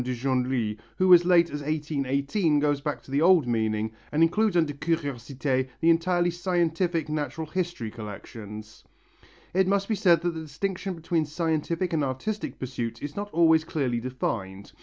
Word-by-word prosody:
de 125 0 -2
Genlis, 125 -3 0 0.2
who 185 -1 +6
as 175 0 +7
late 170 -2 +4
as 145 0 -4
1818 150 +2 0
goes 145 -1 +1
back 150 0 -3
to - - -14
the 140 +2 +1
old 175 -4 +5
meaning 110 -2 0 0.2
and 155 +2 +3
includes 195 +3 +2
under 160 -3 +2
curiosité 140 -3 -2
the 165 - +5
entirely 175 +1 +2
scientific 175 -2 0
Natural 150 0 -3
History 165 -9 -3
collections. 110 0 -9 0.7
It 190 +1 +3
must 200 0 +1
be 225 - 0
said 180 -6 +4
that 175 -1 0
the 160 - -5
distinction 185 +5 -4
between 165 -1 -1
scientific 165 +2 -1
and 155 -2 +1
artistic 140 +11 -3
pursuits 120 -3 -4
is 145 0 -6
not 205 0 -4
always 160 -1 +4
clearly 135 -7 -1
defined. 100 -6 -4
155 Hz, 160 wpm, -26 LUFS, 130-175 Hz, 0.7 s, as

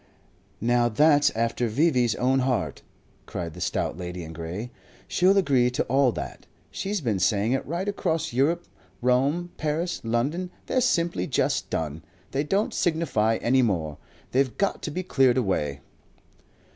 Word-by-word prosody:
"Now 120 +1 +2
that's 145 +5 +5
after 115 +1 0
V.V.'s 125 -2 +2
own 130 +2 +2
heart," 130 -2 -1 0.5
cried 85 -2 -5
the - - -10
stout - - -1
lady 90 0 -5
in 80 0 -8
grey. 85 +9 -5 0.4
"She'll 190 +2 +3
agree 135 -10 +3
to 125 - -1
all 135 0 +3
that. - - -7 0.2
She's 200 -1 -2
been 110 -8 0
saying 100 +5 +2
it 135 - +1
right 170 +6 -2
across 165 -8 -1
Europe. 160 +7 +1 0.3
Rome, 140 +8 +1
Paris, 165 +3 -2
London; 135 +11 -1 0.2
they're 255 - +1
simply 170 - +1
just - - 0
done. 80 0 -3 0.3
They 140 +2 0
don't 195 +7 0
signify 140 -10 +1
any 130 +2 +4
more. 85 - -1 0.3
They've 130 -1 +1
got 200 0 0
to - - -3
be 180 +5 -3
cleared 135 -7 +3
away." 75 - -1
130 Hz, 150 wpm, -26 LUFS, 110-160 Hz, 0.5 s, that's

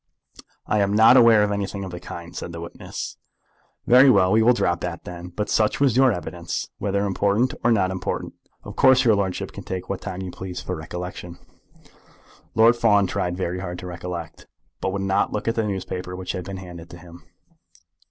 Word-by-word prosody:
"I 105 - +1
am 100 0 +1
not 110 +3 +7
aware 115 -4 +7
of 105 - 0
anything 100 -1 -3
of 95 - -6
the 90 - -7
kind," 85 -1 -9
said - - -5
the 85 - -6
witness. 85 +1 -7 0.7
"Very 130 +3 +7
well. 95 -5 +4
We 110 +2 +4
will 120 +2 +5
drop 85 -6 0
that 85 -2 -5
then. 90 0 -8
But 105 +4 -4
such 110 -1 +1
was 135 -5 +3
your 130 0 +5
evidence, 90 -7 -4
whether 100 0 0
important 100 +5 +1
or 120 - +4
not 95 -4 +2
important. 95 - -4 0.3
Of - - -9
course 130 0 +5
your 115 - +6
lordship 100 -3 -2
can - - -9
take 90 -1 -5
what 100 - -3
time 95 -1 -5
you 90 - -6
please 95 -1 -7
for 90 - -4
recollection." 90 +2 -7 1.2
Lord 115 +2 +6
Fawn 105 -4 +3
tried 90 -1 -2
very 90 -1 -2
hard 90 -1 -5
to 90 - -8
recollect, 85 -2 -7 0.3
but 95 - -2
would 100 0 -3
not 95 0 +1
look 105 - -3
at 115 - +2
the 115 -2 -1
newspaper 90 -2 -4
which 90 0 -4
had 90 -1 -5
been 95 -1 -6
handed 85 -2 -10
to 85 - -11
him. 85 0 -14
95 Hz, 200 wpm, -23 LUFS, 90-105 Hz, 1.2 s, not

